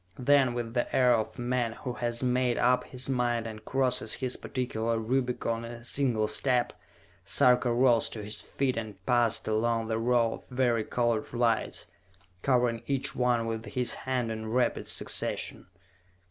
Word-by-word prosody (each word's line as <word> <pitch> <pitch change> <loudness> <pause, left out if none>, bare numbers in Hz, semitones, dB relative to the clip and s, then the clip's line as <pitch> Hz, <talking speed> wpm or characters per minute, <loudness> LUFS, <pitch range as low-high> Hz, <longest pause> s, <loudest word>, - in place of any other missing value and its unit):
Then, 130 -1 +3
with 115 -1 -4
the 120 -1 -1
air 125 -1 +5
of 110 -2 -1
a - - -5
man 120 -2 0
who 125 +2 -5
has 120 0 -3
made 125 -1 +1
up 125 0 +3
his 130 0 -5
mind 120 -3 0
and 110 -1 -7
crosses 130 -1 0
his 130 -2 -1
particular 115 -3 -2
Rubicon 120 0 -1
in 115 +1 -7
a 120 0 -11
single 120 -4 0
step, 120 +3 +1 0.5
Sarka 125 -1 +4
rose 120 -1 +3
to 110 - -5
his 105 +1 -4
feet 130 -3 -2
and 105 -4 -6
passed 120 -2 +2
along 115 +1 0
the 110 0 0
row 115 -1 +2
of - - -11
vari 120 -4 +1
colored 120 -3 0
lights, 120 -2 0 0.6
covering 125 -3 +2
each 135 -1 -1
one 125 -2 +1
with 115 0 -3
his 125 -1 -1
hand 125 -3 -2
in 110 0 -5
rapid 120 +1 0
succession. - - -2
120 Hz, 165 wpm, -29 LUFS, 115-125 Hz, 0.6 s, air